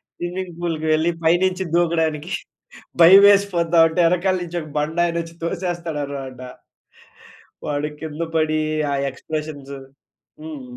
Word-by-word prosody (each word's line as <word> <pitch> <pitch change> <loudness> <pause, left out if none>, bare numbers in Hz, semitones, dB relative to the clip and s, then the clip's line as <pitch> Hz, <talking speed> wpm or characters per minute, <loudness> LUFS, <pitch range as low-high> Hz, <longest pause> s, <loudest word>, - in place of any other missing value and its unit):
Swimming 175 0 -5
పూల్‌కి 165 -2 -2
వెళ్లి 160 +2 +2
పైనుంచి 180 +3 +2
దూకడానికి 165 -1 0 0.7
భయమేసిపోతావుంటే, 175 -3 +6
వెనకాల 180 +2 +1
నుంచి 175 0 -4
ఒక 155 - -10
బండ 155 +3 -2
ఆయన 170 - -3
వచ్చి 165 0 -12
తోసేస్తాడనమాట. 150 -7 -4 1.3
వాడు 145 0 -2
కింద 160 0 -5
పడి 155 -1 +1 0.3
ఆ - - 0 0.2
ఎక్స్‌ప్రెషన్స్ 145 0 -6 0.7
హ్మ్. 310 -4 -7
165 Hz, 105 wpm, -21 LUFS, 155-175 Hz, 1.3 s, భయమేసిపోతావుంటే